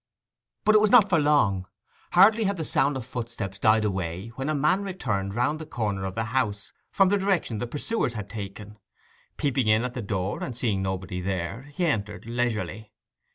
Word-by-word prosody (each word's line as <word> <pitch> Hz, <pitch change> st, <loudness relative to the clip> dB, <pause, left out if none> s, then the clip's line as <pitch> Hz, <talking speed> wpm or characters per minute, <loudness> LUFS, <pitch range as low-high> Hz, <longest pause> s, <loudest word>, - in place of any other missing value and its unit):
But 215 Hz, -, +5 dB
it 215 Hz, -, +6 dB
was 215 Hz, -, +4 dB
not 215 Hz, -4 st, +7 dB
for 170 Hz, -4 st, +4 dB
long. 110 Hz, -11 st, +2 dB, 0.5 s
Hardly 215 Hz, +5 st, +6 dB
had 200 Hz, 0 st, 0 dB
the 160 Hz, -, -3 dB
sound 135 Hz, 0 st, +1 dB
of 125 Hz, -, -6 dB
footsteps 115 Hz, -5 st, -5 dB
died 110 Hz, 0 st, +4 dB
away 95 Hz, 0 st, -3 dB
when 135 Hz, +5 st, -4 dB
a 155 Hz, -, +1 dB
man 155 Hz, +7 st, +2 dB
returned 110 Hz, -, -3 dB
round 145 Hz, +6 st, +1 dB
the 160 Hz, -, -6 dB
corner 105 Hz, -7 st, -2 dB
of 95 Hz, -, -5 dB
the 110 Hz, -, 0 dB
house 105 Hz, -6 st, -1 dB, 0.2 s
from 195 Hz, -1 st, +3 dB
the 205 Hz, +1 st, +2 dB
direction 185 Hz, -, 0 dB
the 120 Hz, -, -3 dB
pursuers 145 Hz, -, -2 dB
had 105 Hz, -3 st, -5 dB
taken. 105 Hz, 0 st, -8 dB, 0.6 s
Peeping 135 Hz, -4 st, 0 dB
in 110 Hz, +2 st, +4 dB
at 125 Hz, -1 st, -3 dB
the 125 Hz, -, -4 dB
door, 100 Hz, -2 st, -2 dB
and 125 Hz, -3 st, -5 dB
seeing 110 Hz, -6 st, 0 dB
nobody 95 Hz, -1 st, -3 dB
there, 95 Hz, +8 st, -4 dB
he 180 Hz, -, +1 dB
entered 105 Hz, -10 st, -2 dB
leisurely. 115 Hz, -2 st, -2 dB
115 Hz, 195 wpm, -26 LUFS, 100-150 Hz, 0.6 s, not